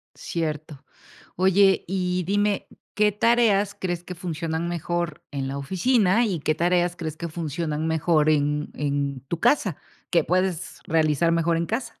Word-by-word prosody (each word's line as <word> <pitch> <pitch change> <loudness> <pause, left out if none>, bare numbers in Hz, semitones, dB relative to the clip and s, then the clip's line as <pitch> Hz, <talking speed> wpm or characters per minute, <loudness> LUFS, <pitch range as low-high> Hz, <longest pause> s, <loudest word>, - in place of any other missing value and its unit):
Cierto, 155 -3 -4 0.5
oye, 190 +1 +4
y 180 -1 -1
dime, 205 +2 0 0.3
¿qué 210 0 +3
tareas 210 -2 +2
crees 175 -2 -3
que 180 0 -8
funcionan 165 -1 -3
mejor 175 -1 -3
en 140 -2 -3
la 135 +1 -4
oficina 195 - +2
y 180 -7 -2
qué 155 +2 0
tareas 175 +1 +1
crees 160 -3 -5
que 170 +1 -5
funcionan 155 -1 -3
mejor 160 -1 +2
en 150 0 +1
en 140 -2 -2
tu 170 - -2
casa, 225 - +2 0.3
que 170 -3 +3
puedes 185 -1 -1
realizar 160 -1 +2
mejor 165 0 +2
en 170 - -1
casa? 225 +6 -4
170 Hz, 150 wpm, -24 LUFS, 155-190 Hz, 0.5 s, oye